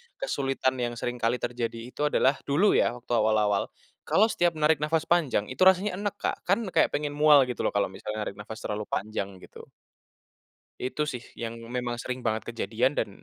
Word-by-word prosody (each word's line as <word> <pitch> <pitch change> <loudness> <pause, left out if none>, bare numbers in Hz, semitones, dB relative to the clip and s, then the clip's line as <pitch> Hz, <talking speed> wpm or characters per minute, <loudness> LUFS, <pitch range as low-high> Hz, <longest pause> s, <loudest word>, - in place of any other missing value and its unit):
kesulitan 135 - -1
yang 120 -1 -2
sering 120 +1 -4
kali 115 +1 +2
terjadi 120 -2 -3
itu 150 - 0
adalah 135 -1 +2
dulu 155 +9 +4
ya 120 - +2
waktu 120 0 -11
awal-awal, 105 -3 +2 0.4
kalau 220 +3 +4
setiap 175 -2 +1
narik 155 -1 +3
nafas 155 +1 +1
panjang 140 -10 +1
itu 130 - -8
rasanya 190 +1 +3
enek, 205 -1 -2
Kak, - - -2
kan 200 +5 +2
kayak - - +4
pengen 145 0 -2
mual 150 -1 +6
gitu 125 -2 -5
loh - - -1
kalau 100 -2 +1
misalnya 105 +2 -5
narik 100 - -7
nafas 110 - -8
terlalu 105 0 -3
panjang 100 -1 -3
gitu. - - -13 1.1
Itu 150 +4 -2
sih 125 -4 -6
yang 115 0 -5 0.2
memang 125 -1 -2
sering 125 +1 -5
banget 110 0 -2
kejadian 120 +4 0
dan - - -1
125 Hz, 185 wpm, -27 LUFS, 115-150 Hz, 1.1 s, mual